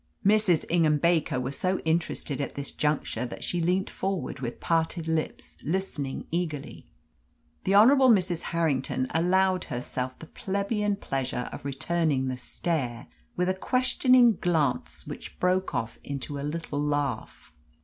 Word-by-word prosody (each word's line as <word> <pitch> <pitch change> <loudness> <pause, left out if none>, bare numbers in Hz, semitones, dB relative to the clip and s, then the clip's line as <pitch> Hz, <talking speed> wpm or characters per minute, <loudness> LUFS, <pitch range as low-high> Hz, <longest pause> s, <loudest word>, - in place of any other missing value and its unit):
Mrs. 205 -5 +4
Ingham 160 -3 +3
Baker 160 -4 +2
was 130 +2 -3
so 185 +1 0
interested 160 -3 -1
at 140 - -4
this 140 0 -4
juncture 150 -5 -1
that - - -8
she 175 - -1
leant 180 +3 +1
forward 190 -7 -3
with 120 -2 -5
parted 165 0 0
lips, 155 - -3
listening 155 -5 -2
eagerly. 160 -4 -3 0.8
The 195 - +3
Honourable 260 +5 +7
Mrs. 180 -6 +3
Harrington 140 -6 0
allowed 185 +2 +2
herself 125 +1 -4
the - - -10
plebeian 200 +4 -1
pleasure 135 -8 -3
of - - -8
returning 140 -1 0
the 130 - -3
stare 125 -4 -3 0.3
with 180 - +1
a 185 - +2
questioning 250 +1 +4
glance 155 -7 0
which - - -9
broke 185 +1 +1
off 115 0 -3
into 140 0 -4
a - - -4
little 150 0 -3
laugh. 145 -5 -2
165 Hz, 140 wpm, -27 LUFS, 140-185 Hz, 0.8 s, Honourable